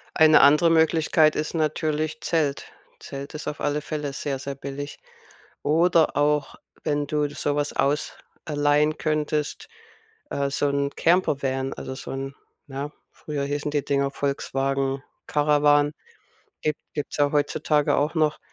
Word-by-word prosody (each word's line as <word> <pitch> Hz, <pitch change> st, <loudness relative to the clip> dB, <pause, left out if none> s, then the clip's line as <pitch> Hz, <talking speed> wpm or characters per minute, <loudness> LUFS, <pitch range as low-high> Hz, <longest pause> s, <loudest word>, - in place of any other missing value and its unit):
Eine 155 Hz, -2 st, +7 dB
andere 150 Hz, +4 st, +6 dB
Möglichkeit 160 Hz, -1 st, +4 dB
ist 155 Hz, +2 st, -2 dB
natürlich 155 Hz, +2 st, -1 dB
Zelt. 150 Hz, -4 st, 0 dB, 0.3 s
Zelt 140 Hz, +1 st, -7 dB
ist 155 Hz, -, -6 dB
auf 150 Hz, -, -5 dB
alle 145 Hz, 0 st, 0 dB
Fälle 150 Hz, -2 st, -4 dB
sehr, 140 Hz, -1 st, -3 dB
sehr 140 Hz, +1 st, -5 dB
billig. 140 Hz, +1 st, -7 dB, 0.6 s
Oder 165 Hz, 0 st, +3 dB
auch 145 Hz, -1 st, +1 dB, 0.3 s
wenn 145 Hz, -1 st, 0 dB
du 150 Hz, 0 st, 0 dB
so 145 Hz, 0 st, -2 dB
was 145 Hz, 0 st, 0 dB
aus 145 Hz, +2 st, 0 dB, 0.3 s
allein 150 Hz, 0 st, +2 dB
könntest, 150 Hz, -1 st, -2 dB, 0.6 s
äh, 140 Hz, 0 st, 0 dB
so 140 Hz, +1 st, +1 dB
'n 140 Hz, 0 st, 0 dB
Campervan, 135 Hz, -6 st, +1 dB
also, 130 Hz, -, -6 dB
so -, -, -7 dB
'n 135 Hz, +1 st, -4 dB, 0.3 s
na, 140 Hz, +1 st, -5 dB, 0.2 s
früher 145 Hz, -2 st, -5 dB
hießen 145 Hz, +1 st, -2 dB
die 145 Hz, -1 st, -1 dB
Dinger 140 Hz, -1 st, +1 dB
Volkswagen 135 Hz, -1 st, -1 dB, 0.2 s
Caravan, 145 Hz, 0 st, +3 dB, 0.7 s
gibt 150 Hz, -1 st, 0 dB, 0.2 s
gibt's 145 Hz, -, -4 dB
ja 145 Hz, -1 st, +2 dB
heutzutage 150 Hz, 0 st, +1 dB
auch 150 Hz, +3 st, 0 dB
noch. 155 Hz, -2 st, +1 dB
145 Hz, 140 wpm, -24 LUFS, 140-150 Hz, 0.7 s, Eine